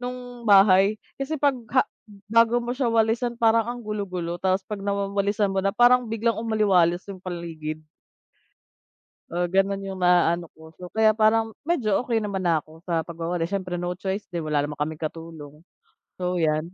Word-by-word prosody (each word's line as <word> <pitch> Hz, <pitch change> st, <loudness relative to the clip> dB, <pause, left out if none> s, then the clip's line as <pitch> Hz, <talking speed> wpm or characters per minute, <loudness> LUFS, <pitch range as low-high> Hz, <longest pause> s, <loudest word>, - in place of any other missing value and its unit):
no'ng 245 Hz, -2 st, -7 dB
bahay? 195 Hz, +1 st, +6 dB, 0.2 s
Kasi 295 Hz, +3 st, -2 dB
'pag 285 Hz, 0 st, +3 dB, 0.2 s
ha 260 Hz, -, +6 dB, 0.5 s
bago 230 Hz, +1 st, +4 dB
mo 240 Hz, -, -2 dB
siya 255 Hz, -1 st, 0 dB
walisan, 230 Hz, +1 st, +1 dB
parang 230 Hz, 0 st, +3 dB
ang 245 Hz, 0 st, -4 dB
gulo-gulo, 185 Hz, -5 st, -4 dB
tapos 190 Hz, 0 st, +1 dB
'pag 205 Hz, +1 st, -6 dB
nawawalisan 200 Hz, 0 st, 0 dB
mo 195 Hz, -, +1 dB
na, 195 Hz, -, +1 dB
parang 245 Hz, +3 st, +4 dB
biglang 225 Hz, +1 st, 0 dB
umaliwalas 195 Hz, -6 st, +2 dB
'yung 185 Hz, -, -12 dB
paligid. 165 Hz, -4 st, -6 dB, 1.5 s
Oo, 175 Hz, +1 st, 0 dB
gano'n 195 Hz, +2 st, +1 dB
'yung 190 Hz, -1 st, -6 dB
naaano 175 Hz, -1 st, +3 dB
ko. 160 Hz, 0 st, -16 dB
So, 180 Hz, +1 st, -10 dB
kaya 220 Hz, 0 st, +3 dB
parang 220 Hz, 0 st, +2 dB
medyo 260 Hz, -, +1 dB
okey 235 Hz, -3 st, 0 dB
naman 200 Hz, -3 st, -3 dB
na 170 Hz, -3 st, +2 dB
ako 155 Hz, +2 st, -14 dB
sa 165 Hz, -3 st, -2 dB
pagwawalis. 170 Hz, +1 st, -3 dB
Siyempre, 185 Hz, -3 st, -2 dB
no 175 Hz, 0 st, -3 dB
choice 190 Hz, +3 st, -4 dB
din, 170 Hz, -3 st, -5 dB
wala 150 Hz, -2 st, 0 dB
naman 145 Hz, 0 st, -6 dB
kaming 155 Hz, +1 st, -2 dB
katulong. 155 Hz, -1 st, -7 dB, 0.6 s
So, 180 Hz, 0 st, -1 dB
'yan. 155 Hz, -1 st, +1 dB
195 Hz, 170 wpm, -24 LUFS, 170-225 Hz, 1.5 s, bahay